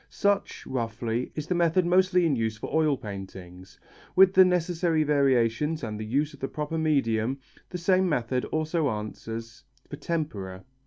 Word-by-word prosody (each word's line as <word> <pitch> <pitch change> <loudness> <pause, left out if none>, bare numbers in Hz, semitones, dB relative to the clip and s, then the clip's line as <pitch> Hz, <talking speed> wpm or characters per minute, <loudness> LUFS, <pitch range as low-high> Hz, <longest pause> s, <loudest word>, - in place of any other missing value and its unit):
Such, 200 0 -1
roughly, 115 -1 -3
is 150 - -4
the 180 - -1
method 175 +1 +2
mostly 180 0 +3
in 155 -4 +2
use 110 -2 -2
for - - -7
oil 155 -3 +2
paintings. 95 -5 -9 0.4
With 190 0 +6
the 185 - +8
necessary 175 -2 +1
variations, 140 +1 +1
and 105 -2 -4
the - - -4
use 145 +7 0
of 140 - -14
the 135 - -2
proper 150 +3 -4
medium, 135 -5 +1 0.3
the 180 - -5
same 185 +1 +2
method 125 -3 0
also 155 -1 -1
answers 115 +1 -6 0.2
for 145 - -8
tempera. 110 - -4
145 Hz, 160 wpm, -27 LUFS, 115-165 Hz, 0.4 s, the